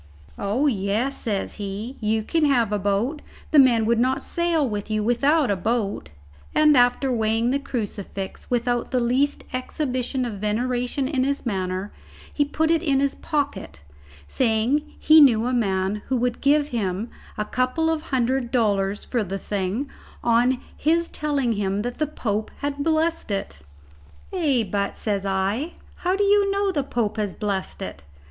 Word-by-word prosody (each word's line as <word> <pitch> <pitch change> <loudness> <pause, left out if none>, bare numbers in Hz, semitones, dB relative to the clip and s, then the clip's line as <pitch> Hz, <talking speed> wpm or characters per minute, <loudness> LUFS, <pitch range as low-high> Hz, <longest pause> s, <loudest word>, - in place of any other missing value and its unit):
"Oh, 210 +8 0
yes," 225 +2 0
says 205 -5 -3
he, 205 +6 -5
"you 220 0 0
can 320 +7 +1
have 240 -7 +2
a 210 - +1
boat. 205 - 0 0.3
The 305 - +7
men 240 -5 +5
would 230 +1 +2
not 255 +2 +1
sail 340 -4 +1
with 205 -2 -4
you 215 -1 0
without 275 +3 +2
a - - +2
boat;" 205 +2 -2 0.5
and 305 -1 +6
after 245 +1 +3
weighing 225 +1 +1
the 280 - +1
crucifix 205 -7 -5
without 240 0 0
the 255 - +1
least 255 +4 +1
exhibition 255 -1 -2
of 215 -5 -5
veneration 245 +5 -1
in 265 -3 0
his 280 +1 -1
manner, 190 -2 -2 0.4
he 290 - +2
put 315 +3 0
it 330 -2 +3
in 280 -5 +2
his 275 0 +1
pocket, 285 - -3 0.5
saying 255 +5 +1
he 310 +1 +7
knew 235 -5 +5
a 250 - 0
man 195 -4 0
who 260 - +1
would 245 0 -1
give 290 +1 +3
him 210 -1 -2 0.3
a 210 - -1
couple 255 +8 0
of 320 -1 -1
hundred 260 -3 0
dollars 205 -4 +1
for 240 -3 -1
the 195 0 -4
thing 200 +7 -2 0.4
on 240 +2 +3 0.2
his 335 +3 +1
telling 285 -5 0
him 200 -1 -1
that 245 +3 -5
the 305 - +1
Pope 215 -7 -2
had 285 0 -2
blessed 320 -2 0
it. 195 - -3 0.7
"Ay, 290 -10 +2
but," 200 -1 -1
says 200 -2 -2
I, 195 - -1 0.2
"how 365 +1 0
do 410 - +1
you 405 0 +4
know 395 0 +1
the 300 -6 0
Pope 235 -5 -2
has 210 -3 -2
blessed 200 -3 -3
it?" 70 - -7
245 Hz, 165 wpm, -24 LUFS, 210-285 Hz, 0.7 s, The